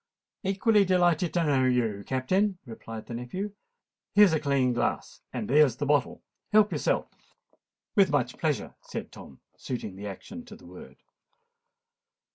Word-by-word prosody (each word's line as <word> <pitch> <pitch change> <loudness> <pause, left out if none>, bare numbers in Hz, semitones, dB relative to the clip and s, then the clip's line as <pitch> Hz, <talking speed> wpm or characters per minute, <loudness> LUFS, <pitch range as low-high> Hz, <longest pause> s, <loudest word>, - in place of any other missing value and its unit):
"Equally 200 +2 +3
delighted 175 -3 +2
to 170 - +3
know 140 -4 +2
you, 115 -5 +1
Captain," 185 - 0
replied 115 -2 -8
the - - -8
nephew. 125 - -4 0.6
"Here's 205 -4 +7
a 160 - +2
clean 140 -4 +1
glass—and 120 - -3
there's 145 -3 +4
the 145 - -3
bottle. 145 -2 +1 0.3
Help 210 0 +5
yourself." - - 0 0.9
"With 200 -3 +5
much 130 -4 0
pleasure," 155 -4 -1
said - - -7
Tom, 65 - -13 0.2
suiting 110 -6 -5
the 100 +2 -7
action 215 - -8
to - - -11
the - - -17
word. - - -12
145 Hz, 140 wpm, -28 LUFS, 125-190 Hz, 0.9 s, Here's